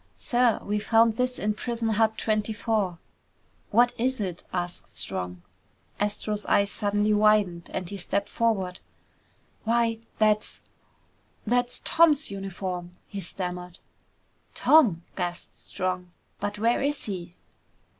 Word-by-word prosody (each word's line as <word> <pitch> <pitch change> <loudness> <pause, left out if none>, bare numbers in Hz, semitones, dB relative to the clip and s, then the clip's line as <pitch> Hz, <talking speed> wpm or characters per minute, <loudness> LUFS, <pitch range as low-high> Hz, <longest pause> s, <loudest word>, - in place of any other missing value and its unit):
"Sir, 245 -2 +2
we 210 +1 -1
found 225 +1 +4
this 250 +1 0
in 210 +1 0
prison 230 +1 -2
hut 220 0 +2
twenty 215 0 0
four." 210 -5 0 0.7
"What 240 +3 +4
is 260 +1 0
it?" 185 -4 -3
asked 175 -1 -5
Strong. 90 -1 -4 0.6
Astro's 210 0 -1
eyes 200 0 +3
suddenly 205 +1 +1
widened 210 -5 +3
and 185 -2 -3
he 200 - -6
stepped 200 +2 -1
forward. 195 -6 0 0.8
"Why, 230 0 +2 0.2
that's... 215 -1 +1 0.8
that's 245 +2 0
Tom's 310 -6 +4
uniform!" 185 -2 -5
he 200 - -6
stammered. 180 -1 -4 0.8
"Tom!" 215 - +5
gasped 175 -1 -4
Strong. 185 -1 -3 0.3
"But 205 0 -3
where 230 +3 +2
is 285 +1 -1
he?" 180 -4 -5
210 Hz, 120 wpm, -27 LUFS, 185-230 Hz, 0.8 s, Tom